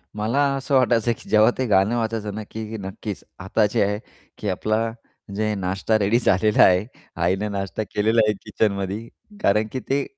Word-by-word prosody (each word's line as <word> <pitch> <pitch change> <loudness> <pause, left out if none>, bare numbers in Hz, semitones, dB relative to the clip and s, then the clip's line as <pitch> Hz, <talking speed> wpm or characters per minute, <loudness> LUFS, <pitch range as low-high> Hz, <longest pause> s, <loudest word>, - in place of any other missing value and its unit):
मला 110 +6 0 0.2
असं 135 0 -1
वाटायचं, 120 -2 +3
की - - -14
जेव्हा 110 +2 +5
ते 130 - 0
गाणं 100 +3 +3
वाजायचं 110 -2 -2
ना, 110 - -4
की 110 0 -5
नक्कीच, 100 +1 -6 0.2
आता 95 +3 +1
जे - - +2
आहे, 105 +1 -1 0.4
की 105 - -3
आपला 110 +4 0 0.5
म्हणजे 105 +1 -1
नाश्ता 95 +3 0
रेडी 105 +4 +3
झालेला 105 -1 +4
आहे. 90 +2 +4 0.4
आईने 95 +4 +1
नाश्ता 100 +1 -3
केलेला 110 +2 +3
आहे 105 - +3
किचनमध्ये 100 +1 -1 0.3
कारण 105 +2 +2
की 130 - -3
ते 140 +1 +2
105 Hz, 170 wpm, -23 LUFS, 100-110 Hz, 0.5 s, जेव्हा